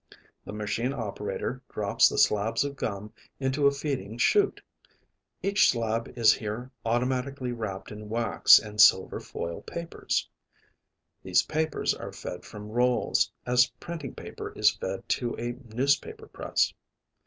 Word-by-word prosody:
The - - -7
machine 105 +5 -2
operator 115 -7 -4
drops - - +3
the - - -4
slabs 105 +4 +3
of 140 0 -4
gum 105 -4 -4 0.3
into 135 +1 +2
a - - +5
feeding 135 -7 -4
chute. 405 - +3 0.8
Each 200 +1 +4
slab 115 -1 -1
is 115 -2 +6
here 115 +4 -5
automatically 125 +2 -1
wrapped 110 -5 -5
in 105 0 -9
wax 115 0 +6
and 105 0 0
silver 95 -2 +5
foil 85 0 -6
papers. 170 0 -3 0.9
These - - +3
papers 155 0 0
are - - -7
fed 90 - -7
from 105 0 -9
rolls, 125 +1 +2
as 125 +1 +4
printing 165 -6 -6
paper - - -7
is - - +4
fed 95 0 -5
to 120 -2 -1
a 120 +1 -3 0.2
newspaper 140 - 0
press. - - 0
120 Hz, 135 wpm, -28 LUFS, 105-140 Hz, 0.9 s, is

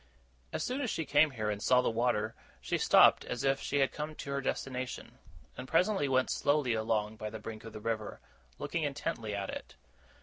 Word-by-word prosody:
As - - -2
soon 255 +3 -2
as 250 - -1
she 160 - -2
came 150 +2 +5
here, 110 -5 -2
and 105 -1 -4
saw 125 +2 +4
the - - +1
water, 110 -2 0 0.3
she - - -2
stopped - - +6
as 125 - -4
if 135 0 +2
she 145 0 0
had 135 - +2
come 155 +1 -5
to 140 - -6
her 140 0 -1
destination; 130 -1 -4 0.4
and 130 - -7
presently 180 0 +2
went 130 -1 +2
slowly 145 -4 +2
along 110 -1 -1
by 110 0 -4
the 110 - -6
brink 110 0 -8
of 115 - -9
the 110 - -7
river, 110 -1 -3 0.4
looking 165 - -2
intently 135 -7 -2
at 100 -1 -3
it. - - -8
125 Hz, 205 wpm, -32 LUFS, 110-145 Hz, 0.4 s, stopped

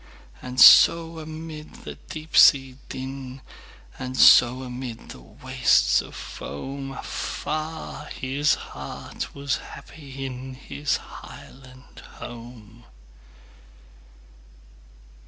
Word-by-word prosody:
And 125 0 -6
so 165 +5 +7
amid 155 0 -9
the - - -7 0.2
deep 155 0 -8
sea 135 -2 +6
din, 130 0 -7 0.6
And 130 0 -5
so 125 +2 +6
amid 125 -2 -7
the - - -10
wastes - - +2
of - - -12
foam, 135 - -7
Afar 155 +2 -5
his 140 +3 0
heart 70 - -8
was 140 -1 -1
happy 135 -3 -9
inHis 130 +2 -4
highland 130 0 -14
home! 120 -1 -11
130 Hz, 85 wpm, -24 LUFS, 125-150 Hz, 0.6 s, so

